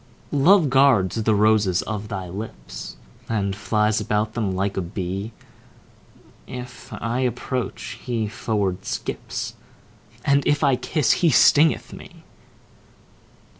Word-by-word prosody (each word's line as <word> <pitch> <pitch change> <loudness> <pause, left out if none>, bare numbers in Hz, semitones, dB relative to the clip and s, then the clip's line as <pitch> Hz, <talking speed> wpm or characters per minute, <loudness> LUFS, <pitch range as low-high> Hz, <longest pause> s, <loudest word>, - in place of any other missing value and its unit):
Love 155 +1 +5
guards 130 -9 +4
the 110 0 +2
roses 105 -3 +3
of 105 -1 -4
thy 95 -3 -5
lips, 100 +5 -8 0.3
And 100 -3 -1
flies 105 +1 +1
about 105 +1 -1
them 105 -6 -1
like 95 +1 -1
a 95 - -1
bee: 95 +4 -4 1.2
If 125 -1 -9
I 115 +2 -3
approach, 125 0 -3
he 115 -3 -1
forward 100 -3 -2
skips, - - -4 0.7
And 140 -1 +4
if 145 +1 +2
I 140 -3 +4
kiss, 150 +2 +1
he 170 - +3
stingeth 150 +3 +4
me. - - -12
110 Hz, 120 wpm, -23 LUFS, 100-130 Hz, 1.2 s, Love